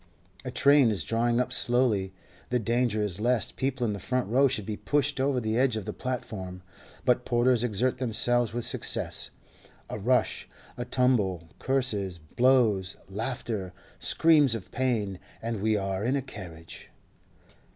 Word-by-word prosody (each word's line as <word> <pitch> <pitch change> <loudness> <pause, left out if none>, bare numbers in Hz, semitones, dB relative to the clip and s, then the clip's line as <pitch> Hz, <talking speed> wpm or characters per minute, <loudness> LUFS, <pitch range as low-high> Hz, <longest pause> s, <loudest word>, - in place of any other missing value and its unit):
A - - -4
train 140 0 +5
is 105 -3 -1
drawing 120 +1 +1
up 125 0 -1
slowly; 120 -6 +3 0.4
the 125 - +2
danger 115 -1 0
is 100 -2 -3
lest 120 +1 +1
people 130 -2 -1
in 105 - 0
the 100 - -5
front 125 +3 -1
row 130 +6 +4
should 125 -6 -1
be 105 - -3
pushed 145 +3 0
over 135 -1 +1
the 110 0 -1
edge 130 -3 +2
of 110 -3 -4
the - - -4
platform, 95 -8 -5 0.4
but 125 0 +3
porters 120 0 +2
exert 125 +2 0
themselves 120 -1 +1
with 120 +1 -2
success. - - -1 0.6
A - - -4
rush, 125 +5 0 0.3
a 120 - -4
tumble, 105 -10 +1
curses, 110 -9 0
blows, 105 - +2
laughter, 110 -3 -4 0.3
screams 150 -7 +4
of 105 - -8
pain—and 115 -2 -3
we 110 0 +2
are 95 0 -2
in 125 +4 +1
a 140 - -1
carriage. 85 -10 -10
120 Hz, 150 wpm, -27 LUFS, 105-125 Hz, 0.6 s, train